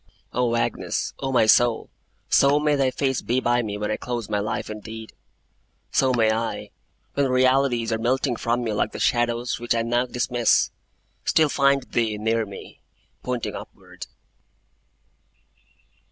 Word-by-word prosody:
O 120 -1 +1
Agnes, 115 - -2
O 135 -1 -2
my 125 -4 +4
soul, 115 +1 +4 0.4
so 140 +2 +4
may 150 0 +2
thy 135 -2 +2
face 135 -1 -1
be 125 +2 0
by 120 -1 +2
me 105 -3 -4
when 105 0 -2
I - - -1
close 120 -4 -4
my 105 -1 0
life 105 +1 -3
indeed; 110 +1 -8 0.8
so 130 -1 +3
may 115 -3 +3
I, 115 +1 -3 0.4
when 140 -1 +1
realities 130 -2 +2
are 110 - -1
melting 125 +2 0
from 120 +2 -1
me, 110 -2 -2
like 105 - -1
the - - -6
shadows 120 0 0
which 120 0 0
I 115 - +1
now 120 +2 0
dismiss, 120 -1 +1 0.5
still 155 -2 +3
find 140 -1 +2
thee 115 -4 -1
near 110 +1 0
me, 100 - -11 0.4
pointing 125 -2 -3
upward! - - -10
120 Hz, 155 wpm, -24 LUFS, 115-130 Hz, 0.8 s, my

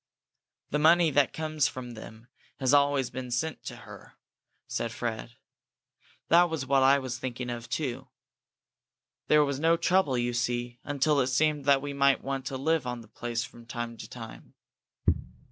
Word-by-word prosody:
"The 150 - +1
money 165 +1 +5
that 145 0 +3
comes 155 -2 0
from 125 -1 -7
them 110 0 -11 0.3
has 130 0 +2
always 140 -2 +3
been 130 -1 -6
sent 130 +6 -2
to - - -6
her," - - -13 0.5
said 115 - -3
Fred. 115 0 -4 0.9
"That 175 +1 +6
was 160 -5 -3
what 135 +1 +3
I 135 +1 +6
was 130 -2 -4
thinking 125 -1 -4
of, 120 -1 -6
too. 130 -2 -3 1.2
There 150 -1 +5
was 140 -1 -2
no 165 +2 +3
trouble, 175 -8 +2
you 120 0 0
see, 120 0 -2
until 145 +1 +1
it 130 - +2
seemed 150 +2 +1
that 140 -1 +4
we 145 0 -4
might 140 -1 +3
want 135 -1 -3
to 135 - -3
live 155 0 0
on 125 -1 -4
the 110 - -15
place 115 +2 -3
from 120 -2 -12
time 120 -1 -5
to - - -9
time." - - -10
130 Hz, 170 wpm, -28 LUFS, 120-145 Hz, 1.2 s, That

